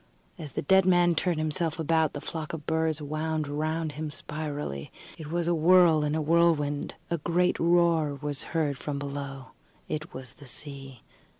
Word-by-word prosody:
As 150 Hz, -5 st, -7 dB
the -, -, -2 dB
dead 190 Hz, +5 st, +4 dB
man 175 Hz, -1 st, +5 dB
turned 170 Hz, +1 st, 0 dB
himself 155 Hz, +1 st, 0 dB
about, 160 Hz, -1 st, +1 dB
the 145 Hz, -, -5 dB
flock 160 Hz, -1 st, -5 dB
of 155 Hz, -2 st, -6 dB
birds 160 Hz, -1 st, 0 dB
wound 155 Hz, +1 st, -2 dB
round 155 Hz, +2 st, -2 dB
him 155 Hz, +1 st, -5 dB
spirally. 145 Hz, -, -5 dB, 0.3 s
It 155 Hz, -2 st, -7 dB
was 170 Hz, 0 st, 0 dB
a 175 Hz, -, +3 dB
whirl 165 Hz, -1 st, +5 dB
in 150 Hz, +1 st, 0 dB
a 160 Hz, -, 0 dB
whirlwind. 155 Hz, -3 st, +2 dB, 0.2 s
A 170 Hz, -, 0 dB
great 175 Hz, +3 st, +1 dB
roar 170 Hz, -3 st, +3 dB
was 145 Hz, -1 st, -3 dB, 0.2 s
heard 145 Hz, -4 st, 0 dB
from 145 Hz, -2 st, -3 dB
below. 140 Hz, -2 st, -6 dB, 0.4 s
It 155 Hz, 0 st, -4 dB
was 130 Hz, -3 st, -7 dB
the 140 Hz, -, -14 dB
sea. 135 Hz, -2 st, -6 dB
155 Hz, 175 wpm, -28 LUFS, 145-165 Hz, 0.4 s, man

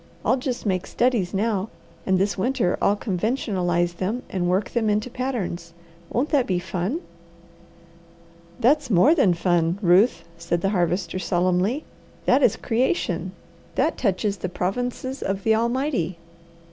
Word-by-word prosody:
I'll 260 Hz, -, +3 dB
just 255 Hz, -2 st, -4 dB
make 185 Hz, -3 st, 0 dB
studies 235 Hz, -7 st, +1 dB
now, 205 Hz, 0 st, -1 dB, 0.4 s
and 190 Hz, -1 st, +3 dB
this 200 Hz, +2 st, +1 dB
winter 195 Hz, -3 st, +1 dB
I'll 205 Hz, -, +3 dB
conventionalize 180 Hz, -5 st, -1 dB
them 215 Hz, +8 st, -2 dB
and 175 Hz, -2 st, 0 dB
work 190 Hz, +2 st, 0 dB
them 225 Hz, -3 st, +1 dB
into 210 Hz, +4 st, 0 dB
patterns. 195 Hz, -11 st, -3 dB, 0.4 s
Won't 265 Hz, +6 st, 0 dB
that 280 Hz, -5 st, +2 dB
be 185 Hz, -, +1 dB
fun?" 185 Hz, -, -2 dB, 1.6 s
"That's 270 Hz, +3 st, +3 dB
more 220 Hz, -, +5 dB
than 210 Hz, -, +3 dB
fun, 170 Hz, 0 st, +1 dB
Ruth," 180 Hz, 0 st, +4 dB, 0.2 s
said 170 Hz, 0 st, -1 dB
the 195 Hz, -, +1 dB
Harvester 180 Hz, -1 st, 0 dB
solemnly. 185 Hz, -, 0 dB, 0.4 s
"That -, -, +4 dB
is -, -, +4 dB
creation. 255 Hz, +9 st, -1 dB, 0.4 s
That -, -, +1 dB
touches 200 Hz, -1 st, 0 dB
the 185 Hz, +1 st, -4 dB
provinces 245 Hz, +9 st, -3 dB
of 195 Hz, 0 st, -2 dB
the 220 Hz, -, +4 dB
Almighty. 235 Hz, -, 0 dB
200 Hz, 140 wpm, -24 LUFS, 180-245 Hz, 1.6 s, more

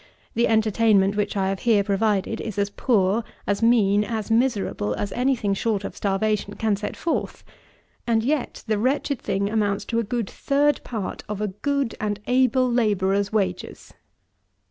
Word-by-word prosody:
The 235 Hz, -, +2 dB
entertainment 215 Hz, -2 st, +3 dB
which 205 Hz, 0 st, -1 dB
I 190 Hz, -1 st, +1 dB
have 195 Hz, -1 st, -2 dB
here 220 Hz, -4 st, +3 dB
provided 205 Hz, +1 st, 0 dB
is 215 Hz, -3 st, -6 dB
as 200 Hz, 0 st, 0 dB
poor, 210 Hz, -2 st, +1 dB, 0.2 s
as 200 Hz, +1 st, -1 dB
mean, 210 Hz, -3 st, +4 dB
as 220 Hz, -1 st, -4 dB
miserable 225 Hz, -, +1 dB
as 200 Hz, -, -3 dB
any 260 Hz, +2 st, +1 dB
thing 205 Hz, -4 st, -1 dB
short 205 Hz, 0 st, -1 dB
of -, -, -6 dB
starvation 205 Hz, +1 st, -1 dB
can 220 Hz, -2 st, +1 dB
set 205 Hz, +1 st, -5 dB
forth; 335 Hz, -, -2 dB, 0.6 s
and 225 Hz, -1 st, +2 dB
yet 280 Hz, +1 st, -2 dB
the 215 Hz, -1 st, 0 dB
wretched 270 Hz, +2 st, 0 dB
thing 200 Hz, +1 st, -1 dB
amounts 205 Hz, -2 st, 0 dB
to 230 Hz, -, -1 dB
a -, -, 0 dB
good 230 Hz, 0 st, -2 dB
third 285 Hz, +4 st, +1 dB
part 220 Hz, -5 st, -5 dB
of 210 Hz, -2 st, -3 dB
a 210 Hz, -1 st, -1 dB
good 275 Hz, +5 st, -1 dB
and 205 Hz, -1 st, -2 dB
able 255 Hz, 0 st, +3 dB
labourer's 200 Hz, -4 st, +1 dB
wages! 190 Hz, -4 st, -3 dB
215 Hz, 165 wpm, -24 LUFS, 200-235 Hz, 0.6 s, mean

